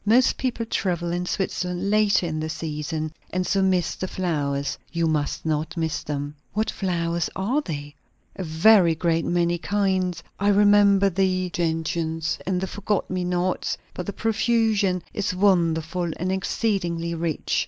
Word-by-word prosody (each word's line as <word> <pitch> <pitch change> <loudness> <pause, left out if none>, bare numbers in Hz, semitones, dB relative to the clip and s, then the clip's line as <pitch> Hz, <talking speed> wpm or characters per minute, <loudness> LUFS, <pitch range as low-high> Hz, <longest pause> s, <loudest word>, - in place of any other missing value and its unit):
Most 235 +4 +4
people 240 -3 -1
travel 175 -6 -1
in 175 +1 -2
Switzerland 180 0 -2
later 210 -3 +3
in 155 -2 -2
the 155 0 -3
season, 155 0 -4 0.2
and 185 0 -1
so 195 - +1
miss 185 -3 +2
the 185 - -4
flowers. 145 -7 -2
You 170 -1 0
must 155 -2 -1
not 160 +2 -1
miss 160 -1 -1
them." 145 0 -4 0.2
"What 215 +1 0
flowers 170 -3 -1
are 235 +11 0
they?" 145 - -6 0.4
"A 190 - -4
very 170 +1 +5
great 165 0 +1
many 175 0 +1
kinds. 185 -3 0 0.2
I 200 - +1
remember 205 -1 +5
the 185 0 0
gentians, 165 -1 -1
and 185 -1 +1
the - - 0
forget 205 +1 -2
me 185 -1 -1
nots; 180 +1 -1 0.2
but 180 - -6
the - - -1
profusion 220 -5 +1
is 195 -2 -1
wonderful, 175 -2 +2
and 185 +2 -1
exceedingly 185 -4 -1
rich. 165 -2 -1
180 Hz, 155 wpm, -24 LUFS, 165-195 Hz, 0.4 s, very